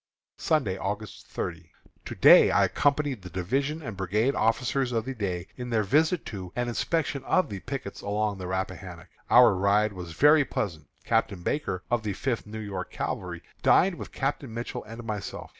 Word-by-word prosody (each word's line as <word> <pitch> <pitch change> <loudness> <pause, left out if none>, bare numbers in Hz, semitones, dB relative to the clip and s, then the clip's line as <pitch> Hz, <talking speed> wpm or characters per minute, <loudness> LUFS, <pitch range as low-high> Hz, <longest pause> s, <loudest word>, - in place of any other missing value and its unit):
Sunday, 115 -13 +1
August 105 +2 -5
30. 85 -1 -5 0.4
To - - -6
day - - +8
I - - +4
accompanied 145 -5 +1
the 90 - -9
division 135 - -2
and 115 -6 -5
brigade 105 +8 +1
officers 125 +3 +1
of 115 -2 -1
the 135 - -3
day 95 -7 -3
in 125 -1 -5
their 110 -3 +2
visit 155 - +2
to 95 -4 -7
and 120 0 -1
inspection 140 +3 -1
of 185 - +2
the 100 -2 -5
pickets 130 -3 -6
along 105 -1 -1
the 90 - -5
Rappahannock. 95 -2 -5 0.2
Our - - +7
ride 100 +3 +2
was 90 -3 -7
very 150 - +6
pleasant. 85 - -4 0.2
Captain 90 -3 0
Barker, 95 -10 -2
of 120 -1 +2
the 105 -2 -3
Fifth 115 +2 -2
New 110 +1 -7
York 100 -4 -5
Cavalry, - - -4 0.2
dined 190 +1 +5
with - - -8
Captain 135 -2 -2
Mitchell 120 +2 -5
and 115 +2 -9
myself. 105 -3 -5
110 Hz, 175 wpm, -27 LUFS, 95-135 Hz, 0.4 s, day